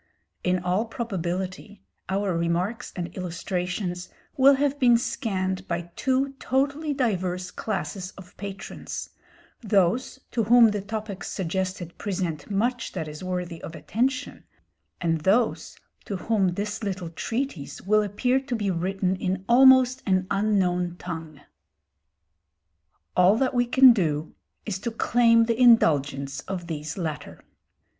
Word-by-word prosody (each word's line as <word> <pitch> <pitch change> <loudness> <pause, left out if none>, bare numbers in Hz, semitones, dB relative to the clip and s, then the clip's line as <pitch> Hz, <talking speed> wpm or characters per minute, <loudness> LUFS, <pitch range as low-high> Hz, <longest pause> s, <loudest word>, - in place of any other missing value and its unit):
In 180 0 +2
all 180 +4 0
probability 190 -2 -4 0.3
our 195 -1 0
remarks 175 +8 -1
and 175 -1 -5
illustrations 180 0 -3 0.3
will 275 -1 +6
have 285 +1 0
been 240 -3 +6
scanned 190 -6 -2
by 170 0 -3
two 265 +1 0
totally 280 +4 0
diverse 185 -9 -1
classes 195 -3 -4
of 180 -2 -13
patrons, 200 0 -7 0.5
those 210 +4 +1
to 230 -3 0
whom 235 +1 +7
the 205 -1 -2
topics 210 -1 -5
suggested 185 -1 -3
present 180 -6 -3
much 235 +5 -1
that 160 -4 -4
is 150 +3 -8
worthy 180 -2 -4
of 165 - -8
attention, 255 +10 -2 0.6
and 165 -2 0
those 215 +7 +1 0.3
to 200 - -4
whom 190 -2 0
this 205 +3 -3
little 185 -4 -3
treatise 225 - -4
will 215 +2 +3
appear 245 +6 +1
to 265 -2 -4
be 205 -4 -1
written 185 +2 -1
in 185 0 -3
almost 260 +1 +6
an 185 -1 +2
unknown 180 -4 +1
tongue. 160 -5 -7 1.7
All 185 +4 +5
that 260 +2 +1
we 245 -1 +2
can 260 0 +8
do 155 -7 -1 0.3
is 195 -3 -3
to 235 - -3
claim 230 0 +4
the 230 +1 0
indulgence 145 - +4
of 185 -2 -4
these 155 -1 -5
latter. 160 -5 -5
195 Hz, 130 wpm, -25 LUFS, 180-235 Hz, 1.7 s, can